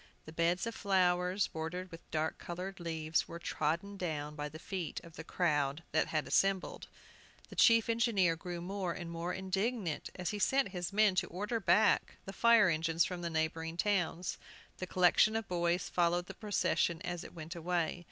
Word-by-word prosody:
The 155 - -9
beds 170 +2 +1
of 230 - -3
flowers, 185 -1 +2
bordered 180 +3 -5
with 165 0 -12
dark 155 0 -1
colored 185 +3 -6
leaves, 160 -2 -1
were 170 - -7
trodden 170 +4 -2
down 150 -5 -3
by 150 0 -4
the 155 - -9
feet 175 -1 -4
of 165 -1 -13
the 160 - -7
crowd 150 -3 0
that 160 - +2
had 155 -2 -1
assembled. 195 -1 +1 0.6
The - - -10
chief 230 -1 +5
engineer 225 -7 +2
grew 175 +1 -6
more 185 -1 -3
and 175 -2 -6
more 170 +1 -3
indignant, 190 -1 -2
as 180 -1 -3
he 210 - -4
sent 265 +4 +2
his 180 -1 -4
men 210 -1 +4
to - - +2
order 210 +6 -3
back 215 +1 +3
the 195 - -7
fire 230 0 +5
engines 165 0 +2
from 180 -1 -5
the 170 - -2
neighboring 160 +1 -2
towns. 180 -3 0 0.4
The 185 - -5
collection 185 +4 +4
of 225 -2 -2
boys 175 0 0
followed 175 0 +1
the - - -8
procession 205 -5 0
as 175 -1 -4
it - - -11
went 160 +1 -7
away. 170 0 -1
175 Hz, 180 wpm, -33 LUFS, 165-195 Hz, 0.6 s, chief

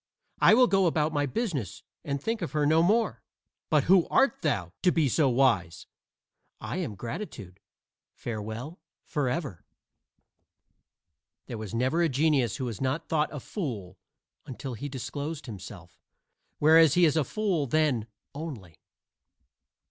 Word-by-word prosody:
I - - +7
will 250 +1 +6
go 195 -5 +3
about 155 -1 +1
my 145 -1 +1
business 155 - -3 0.2
and 140 -1 -2
think 225 +9 -2
of 160 -6 -4
her 150 -1 +1
no 160 +2 +4
more. 215 +7 +2 0.5
But 150 -3 +3
who 180 +1 +4
art 270 -3 +2
thou, 100 - -1
to 180 - +4
be 160 -4 +2
so 140 +2 +2
wise?" 115 -10 +1 0.7
"I - - -5
am 160 - -3
Gratitude 110 - -7 0.6
farewell 115 - -6 0.2
forever." 135 - -3 1.8
There 115 - -6
was 110 0 -6
never 130 +8 +1
a 170 - +3
genius 135 -4 +2
who 130 - -3
was 115 -5 -5
not 135 +4 -2
thought 155 -1 +1
a 150 - -5
fool 110 - -6 0.5
until 130 +1 -6
he 140 +6 -6
disclosed 145 +3 -5
himself; 95 -6 -10 0.6
whereas 160 0 +6
he 175 -1 +6
is 155 - +2
a 155 - +3
fool 180 - -1
then 140 -6 +1 0.3
only. 135 - -8
145 Hz, 140 wpm, -28 LUFS, 115-165 Hz, 1.8 s, I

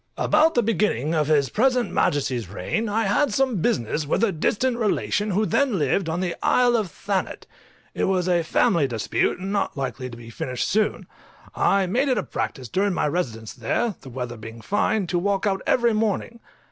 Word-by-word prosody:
_ - - -1
About 310 +1 +4
the 240 - +3
beginning 200 - 0
of 155 -3 +1
his 145 -4 +3
present 250 - +1
Majesty's 130 -8 0
reign 215 - -2
I 220 +2 +1
had 215 +7 +2
some 260 0 +1
business 145 +3 0
with 175 - +1
a 225 - +3
distant 235 +9 0
relation 210 -1 0
who 205 +3 +1
then 265 -2 +1
lived 160 +4 0
on 165 +3 -2
the 175 -2 -1
Isle 245 -1 +3
of 215 -5 0
Thanet; 195 +3 -3 0.5
it - - 0
was 185 -2 +1
a 175 -2 +3
family 170 - +2
dispute, 115 -4 -1
and 190 +2 -5
not 200 -6 -1
likely 130 -1 -4
to 115 - -10
be 115 -1 -11
finished 125 +2 -3
soon. 215 +1 0 0.5
I 195 -1 +2
made 245 +10 +1
it 255 - +2
a - - 0
practice 130 -5 -4
during 195 - 0
my 150 - +1
residence 120 -9 -3
there, 205 - -1
the 135 - -11
weather 125 -1 -5
being 115 +1 -10
fine, 205 - 0
to 175 0 -1
walk 195 +2 0
out 195 -2 0
every 235 -2 +3
morning. 220 +2 -1
190 Hz, 195 wpm, -23 LUFS, 140-220 Hz, 0.5 s, About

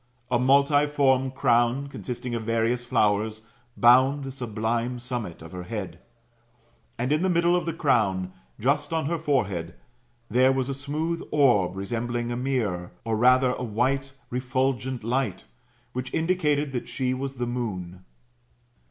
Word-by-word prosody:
A 120 - +3
multiform 140 0 +3
crown, 125 0 +2
consisting 125 -3 -5
of 115 - -2
various 115 +2 0
flowers, 110 -1 +1 0.3
bound 130 +4 +5
the 135 - -5
sublime 120 0 -2
summit 120 -9 -5
of 80 - -11
her 90 -1 -6
hewl. 105 -2 -4 1.1
And 125 +3 -1
in 155 +2 +2
the 190 - +2
middle 170 0 +3
of 175 - -1
the 165 - -1
crown, 100 - +1 0.3
just 145 +4 +1
on 160 -3 0
her 165 +3 -1
forehead, 100 - -1 0.5
there 130 +4 +4
was 135 0 -1
a - - -1
smooth 155 +5 -3
orb 120 -12 +3
resembling 120 +4 -3
a - - -2
mirror, 115 -9 -2
or 115 -1 0
rather 125 +3 +4
a 125 - -4
white 130 +4 0 0.2
refulgent 130 0 -1
light, 115 -5 -1 0.5
which 125 0 -4
indicated 150 -4 +1
that 125 -2 -4
she 130 -1 -1
was 135 +1 -4
the 120 -1 -2
moon. 95 -7 -4
125 Hz, 145 wpm, -26 LUFS, 115-135 Hz, 1.1 s, bound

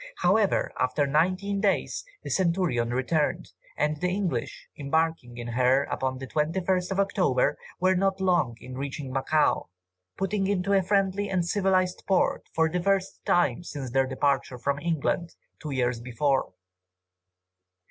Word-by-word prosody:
However, 195 +3 +2
after 130 +3 +1
nineteen 185 +7 +1
days, 200 -2 0 0.2
the - - -5
Centurion 170 -10 +1
returned, 145 +5 0 0.3
and 150 +1 +1
the 180 +4 -1
English, 190 -1 -3
embarking 150 -4 -1
in 120 0 -5
her 125 +3 +3
upon 130 -2 -2
the 135 - -6
21st 175 +6 0
of 190 - -1
October, 180 -9 +2 0.2
were 185 +1 +3
not 195 +1 +1
long 175 -11 +1
in 130 - -9
reaching 135 0 -5
Macao, 150 +3 +1 0.5
putting 195 0 0
into 200 0 0
a 195 - +5
friendly 195 +1 +1
and 185 -3 0
civilized 185 -1 +1
port 190 -2 +1
for 160 0 +3
the 175 +2 -2
first 195 0 0
time 175 -3 +2
since 140 -7 -6
their 135 +1 +2
departure 135 -1 0
from 140 +3 -1
England, 170 +1 -1 0.3
two 155 - -5
years 125 -3 0
before. 130 +2 0
160 Hz, 145 wpm, -27 LUFS, 135-190 Hz, 0.5 s, a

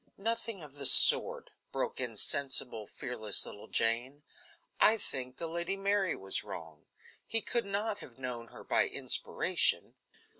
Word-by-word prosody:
"Nothing 230 -2 -2
of 145 -2 -13
the 140 -2 +2
sort," - - +6 0.2
broke - - -4
in 120 -4 -2
sensible, 130 -4 0
fearless 110 -5 -4
little 105 - -12
Jane; 120 +6 0 0.6
"I 225 - +4
think 130 -9 -2
the 170 - -5
Lady 170 +3 -3
Mary 195 -1 -1
was 95 0 -2
wrong. 80 -7 -11 0.4
He 225 - +3
could 235 0 -2
not 205 +1 -3
have 120 - -14
known 125 -3 -7
her - - -14
by - - +1
inspiration." - - +1
135 Hz, 145 wpm, -31 LUFS, -, 0.6 s, sort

